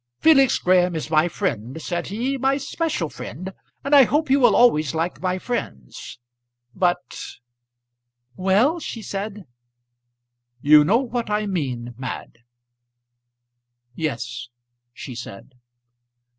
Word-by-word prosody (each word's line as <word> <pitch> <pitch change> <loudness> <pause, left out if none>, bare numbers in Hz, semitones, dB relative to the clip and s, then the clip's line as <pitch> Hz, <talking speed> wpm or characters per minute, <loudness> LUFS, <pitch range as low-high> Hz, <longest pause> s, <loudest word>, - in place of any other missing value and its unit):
"Felix 275 -5 +5
Graham 180 -1 +2
is 155 0 -4
my 155 +1 +4
friend," 140 - -3
said 175 +2 -3
he, 240 +7 -2
"my 270 +1 +1
special 280 - -2
friend; 150 +8 -8 0.3
and 280 +2 -2
I 275 -2 +8
hope 300 +1 0
you 275 - +5
will 245 - +5
always 155 - +4
like 165 +2 -2
my 185 0 0
friends. 70 - -6 0.6
But 180 +2 -2 0.4
" 120 0 -51
"Well?" 260 - +3
she 230 -8 -6
said. 200 0 -5 1.1
"You 150 +3 +6
know 200 +10 +3
what 240 -3 -3
I 210 0 0
mean, 130 -11 -3
Mad" 125 -2 -7 1.5
"Yes," 125 -5 -4 0.4
she 125 +2 -9
said. 120 0 -9
180 Hz, 120 wpm, -22 LUFS, -, 1.5 s, I